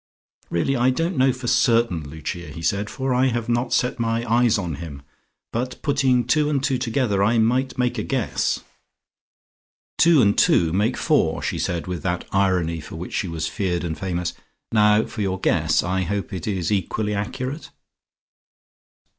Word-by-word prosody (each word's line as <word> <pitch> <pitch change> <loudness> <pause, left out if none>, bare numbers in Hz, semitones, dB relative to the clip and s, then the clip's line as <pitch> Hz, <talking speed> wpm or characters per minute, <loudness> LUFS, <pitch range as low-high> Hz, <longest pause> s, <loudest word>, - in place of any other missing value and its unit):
"Really, 85 +11 0
I 125 0 +3
don't 165 +7 -1
know 130 -1 +4
for 130 0 -8
certain, 115 -6 +2
Lucia," 80 +3 -6
he 80 +2 -9
said, 100 +5 0
"for 130 -1 -2
I 130 +1 +3
have 120 -2 -2
not 120 +1 0
set 125 0 +1
my 115 0 0
eyes 115 0 +3
on 85 -7 -3
him. 75 -4 -8 0.5
But 125 +2 -3
putting 135 -4 +2
two 150 +4 +2
and 140 -3 0
two 135 -3 +1
together, 115 -5 0
I 110 +4 +3
might 125 +4 +1
make 125 -1 0
a - - -2
guess." 130 -7 -1 1.4
"Two 165 -2 +6
and 100 0 +3
two 80 -2 +3
make 105 +6 +1
four," - - +1
she - - -2
said 85 -2 -2
with 90 -3 -4
that 90 -1 -2
irony 90 -4 +1
for 75 - -10
which 85 +2 -7
she 95 - -1
was 80 -2 -3
feared 90 -1 -2
and 80 -2 -3
famous. 90 -2 -3 0.4
"Now 105 0 +4
for 110 - -6
your 95 -2 -1
guess. - - +2
I 95 +1 0
hope 100 +3 -3
it 95 0 -5
is 95 -3 -1
equally 105 +2 -1
accurate." 130 +8 -4
105 Hz, 175 wpm, -23 LUFS, 90-125 Hz, 1.4 s, Two